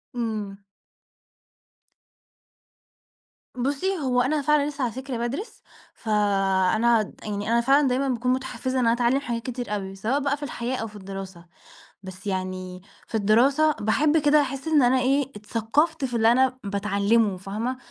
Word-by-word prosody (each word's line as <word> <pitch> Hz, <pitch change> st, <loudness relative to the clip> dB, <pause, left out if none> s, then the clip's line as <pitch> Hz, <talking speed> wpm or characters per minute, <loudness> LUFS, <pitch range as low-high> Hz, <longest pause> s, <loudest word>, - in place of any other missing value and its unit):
إمم. 215 Hz, -4 st, -3 dB, 3.0 s
بُصّي، 285 Hz, +10 st, -1 dB
هو 255 Hz, -4 st, +1 dB
أنا 290 Hz, +4 st, +1 dB
فعلًا 295 Hz, 0 st, +2 dB
لسّة 285 Hz, -2 st, -4 dB
على 240 Hz, -, 0 dB
فكرة 260 Hz, -1 st, -5 dB
بادرس 250 Hz, -, -5 dB, 0.3 s
ف 225 Hz, -, -9 dB
آآ 195 Hz, -2 st, +2 dB
أنا 230 Hz, -1 st, +2 dB
يعني 205 Hz, +1 st, -3 dB
أنا 235 Hz, 0 st, +3 dB
فعلًا 275 Hz, +3 st, +4 dB
دايمًا 260 Hz, +2 st, 0 dB
باكون 250 Hz, +1 st, 0 dB
متحفزة 260 Hz, 0 st, -3 dB
إن 250 Hz, -, +1 dB
أنا 230 Hz, -, +4 dB
أتعلم 245 Hz, +2 st, +2 dB
حاجات 240 Hz, -4 st, -4 dB
كتير 245 Hz, -4 st, -4 dB
أوي، 195 Hz, -1 st, -5 dB
سواء 225 Hz, +8 st, -1 dB
بقى 285 Hz, 0 st, 0 dB
في 290 Hz, -, -9 dB
الحياة 250 Hz, -1 st, -3 dB
أو 225 Hz, -, -4 dB
في 210 Hz, -, -14 dB
الدراسة 195 Hz, -3 st, -8 dB, 0.6 s
بس 190 Hz, +2 st, -9 dB
يعني 185 Hz, -1 st, -4 dB, 0.3 s
في -, -, -6 dB
الدراسة 255 Hz, +9 st, +4 dB
باحب 295 Hz, +9 st, +2 dB
كده 300 Hz, 0 st, +4 dB
أحس 275 Hz, +1 st, -4 dB
إن 310 Hz, -2 st, +4 dB
أنا 255 Hz, +1 st, +4 dB
إيه، 270 Hz, +1 st, +1 dB
اتثقفت 240 Hz, +9 st, 0 dB
في 245 Hz, -2 st, -4 dB
اللي 225 Hz, 0 st, +4 dB
أنا 260 Hz, +1 st, +2 dB
باتعلمه 200 Hz, +1 st, +1 dB
فاهمة 215 Hz, +7 st, -4 dB
240 Hz, 155 wpm, -24 LUFS, 205-270 Hz, 3.0 s, فعلًا